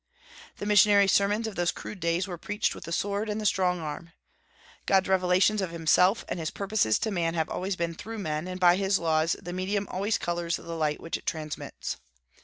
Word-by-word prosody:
The -, -, -5 dB
missionary 205 Hz, -1 st, +5 dB
sermons 205 Hz, +3 st, +2 dB
of 220 Hz, -, -4 dB
those 175 Hz, 0 st, +1 dB
crude 210 Hz, -, -8 dB
days 170 Hz, +3 st, 0 dB
were 175 Hz, -3 st, -6 dB
preached 210 Hz, +4 st, -1 dB
with -, -, -10 dB
the 170 Hz, -, -7 dB
sword 200 Hz, +4 st, -1 dB
and 210 Hz, +1 st, -2 dB
the 215 Hz, -, -4 dB
strong 180 Hz, -3 st, +2 dB
arm. 165 Hz, +1 st, -6 dB, 0.7 s
God's 190 Hz, -1 st, +3 dB
revelations 190 Hz, +2 st, +3 dB
of 190 Hz, -, -2 dB
himself 170 Hz, +5 st, +3 dB
and -, -, -3 dB
his 160 Hz, -1 st, -2 dB
purposes 200 Hz, -, +1 dB
to 220 Hz, -, -2 dB
man 170 Hz, -3 st, -1 dB
have 160 Hz, -1 st, 0 dB
always 190 Hz, +1 st, -2 dB
been 170 Hz, -1 st, -2 dB
through 225 Hz, +7 st, -7 dB
men, 155 Hz, -4 st, -3 dB
and 185 Hz, 0 st, -5 dB
by 175 Hz, 0 st, +5 dB
His 195 Hz, 0 st, +2 dB
laws 160 Hz, 0 st, +1 dB
the 175 Hz, -, -7 dB
medium 195 Hz, +2 st, -1 dB
always 200 Hz, +4 st, 0 dB
colors 170 Hz, -1 st, -2 dB
the -, -, -8 dB
light 160 Hz, -3 st, -2 dB
which 165 Hz, -, -3 dB
it -, -, -18 dB
transmits. 155 Hz, -2 st, -4 dB
180 Hz, 210 wpm, -27 LUFS, 170-200 Hz, 0.7 s, missionary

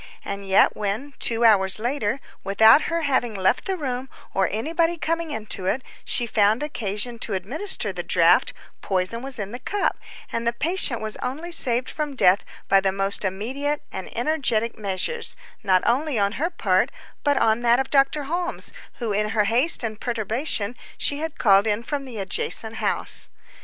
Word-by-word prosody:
And 200 Hz, 0 st, -5 dB
yet 190 Hz, -, +4 dB
when, 215 Hz, +8 st, -3 dB
two 235 Hz, 0 st, +3 dB
hours 195 Hz, -4 st, +5 dB
later, 240 Hz, +1 st, -1 dB, 0.2 s
without 220 Hz, +7 st, +6 dB
her 335 Hz, 0 st, 0 dB
having 260 Hz, -6 st, +1 dB
left 190 Hz, -1 st, +1 dB
the 385 Hz, -1 st, -2 dB
room 260 Hz, -4 st, -4 dB, 0.2 s
or 195 Hz, -1 st, +1 dB
anybody 330 Hz, +9 st, 0 dB
coming 330 Hz, +1 st, -2 dB
into 215 Hz, -8 st, -3 dB
it, 255 Hz, +7 st, 0 dB, 0.2 s
she 240 Hz, -, 0 dB
found 220 Hz, +3 st, +2 dB
occasion 235 Hz, -4 st, -3 dB
to 215 Hz, -, -1 dB
administer 270 Hz, -, -1 dB
the -, -, -3 dB
draught, -, -, +4 dB, 0.3 s
poison 190 Hz, +4 st, -1 dB
was 270 Hz, 0 st, -5 dB
in 205 Hz, -2 st, -5 dB
the 245 Hz, -, -6 dB
cup, 395 Hz, +10 st, -1 dB, 0.3 s
and 230 Hz, 0 st, -2 dB
the 235 Hz, -, +2 dB
patient 300 Hz, -3 st, 0 dB
was 215 Hz, 0 st, -4 dB
only 310 Hz, +7 st, -5 dB
saved 250 Hz, -6 st, 0 dB
from 300 Hz, -2 st, -4 dB
death 185 Hz, -5 st, +4 dB, 0.2 s
by 195 Hz, -, +5 dB
the 195 Hz, 0 st, +1 dB
most 195 Hz, +1 st, 0 dB
immediate 265 Hz, +11 st, -2 dB
and 190 Hz, -, -6 dB
energetic 240 Hz, -4 st, 0 dB
measures, 215 Hz, -, -1 dB, 0.3 s
not 190 Hz, -4 st, +3 dB
only 275 Hz, +2 st, +1 dB
on 200 Hz, -1 st, +2 dB
her 305 Hz, +10 st, -1 dB
part, 220 Hz, -, +1 dB, 0.3 s
but 285 Hz, -1 st, +2 dB
on 220 Hz, +1 st, +3 dB
that 240 Hz, +1 st, +3 dB
of 265 Hz, -, -2 dB
Dr. 275 Hz, +1 st, +3 dB
Holmes, 345 Hz, +5 st, -2 dB, 0.2 s
whom 230 Hz, -4 st, -3 dB
in 210 Hz, +1 st, 0 dB
her 220 Hz, -1 st, +2 dB
haste 240 Hz, +9 st, +3 dB
and 220 Hz, -2 st, -4 dB
perturbation 230 Hz, 0 st, -1 dB, 0.2 s
she 285 Hz, -, 0 dB
had 320 Hz, 0 st, -4 dB
called 200 Hz, -1 st, +5 dB
in 210 Hz, +2 st, +1 dB
from 280 Hz, +1 st, -3 dB
the 250 Hz, -4 st, -8 dB
adjacent 425 Hz, -, -1 dB
house. -, -, 0 dB
235 Hz, 175 wpm, -23 LUFS, 205-290 Hz, 0.3 s, without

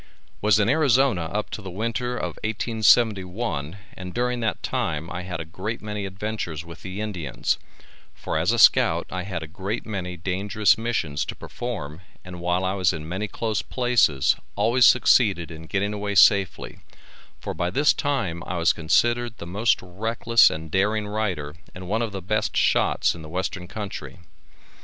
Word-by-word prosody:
Was 105 Hz, -1 st, +4 dB
in 105 Hz, -, +2 dB
Arizona 135 Hz, -, +3 dB
up 105 Hz, +6 st, -3 dB
to -, -, -5 dB
the 95 Hz, -, -7 dB
winter 115 Hz, +5 st, -2 dB
of -, -, -4 dB
1871 105 Hz, -6 st, +1 dB, 0.2 s
and 90 Hz, -1 st, -9 dB
during 125 Hz, 0 st, 0 dB
that 110 Hz, -2 st, -2 dB
time 80 Hz, 0 st, -2 dB
I 90 Hz, -, -4 dB
had 90 Hz, -2 st, -5 dB
a 80 Hz, -, -5 dB
great 95 Hz, +8 st, -5 dB
many 105 Hz, -2 st, -4 dB
adventures 95 Hz, -5 st, -5 dB
with 85 Hz, 0 st, -11 dB
the 95 Hz, +1 st, -6 dB
Indians, 90 Hz, -11 st, -2 dB, 0.6 s
for -, -, -5 dB
as -, -, +2 dB
a -, -, 0 dB
scout -, -, +5 dB
I 90 Hz, -, -3 dB
had 90 Hz, -3 st, -5 dB
a -, -, -7 dB
great 95 Hz, +7 st, -4 dB
many 90 Hz, -4 st, -4 dB
dangerous 100 Hz, +4 st, +1 dB
missions 115 Hz, -11 st, -2 dB
to -, -, -6 dB
perform 90 Hz, -10 st, -6 dB, 0.2 s
and 90 Hz, -1 st, -8 dB
while 90 Hz, +2 st, 0 dB
I 95 Hz, -, 0 dB
was 95 Hz, -2 st, +2 dB
in 80 Hz, -1 st, -6 dB
many 95 Hz, +5 st, -3 dB
close 110 Hz, 0 st, -2 dB
places 120 Hz, -, +2 dB, 0.2 s
always 120 Hz, +4 st, +4 dB
succeeded 100 Hz, -8 st, +4 dB
in 80 Hz, 0 st, -10 dB
getting 100 Hz, +2 st, -1 dB
away 100 Hz, -1 st, -3 dB
safely 100 Hz, -2 st, +4 dB, 0.6 s
for -, -, -5 dB
by 85 Hz, -, -1 dB
this 145 Hz, +11 st, +3 dB
time 120 Hz, -, -2 dB
I 90 Hz, -, -3 dB
was 85 Hz, 0 st, +3 dB
considered 120 Hz, +8 st, +1 dB
the -, -, -8 dB
most 105 Hz, +7 st, +1 dB
reckless 115 Hz, +5 st, +3 dB
and 80 Hz, 0 st, -6 dB
daring 105 Hz, +3 st, +1 dB
rider 95 Hz, -9 st, -2 dB, 0.2 s
and 90 Hz, 0 st, -8 dB
one 110 Hz, +4 st, 0 dB
of 115 Hz, -2 st, -2 dB
the 95 Hz, -2 st, -6 dB
best 105 Hz, +3 st, -1 dB
shots -, -, +2 dB
in 85 Hz, -, -10 dB
the 80 Hz, -, -10 dB
western 90 Hz, +1 st, -3 dB
country. 100 Hz, 0 st, -7 dB
100 Hz, 175 wpm, -24 LUFS, 90-110 Hz, 0.6 s, scout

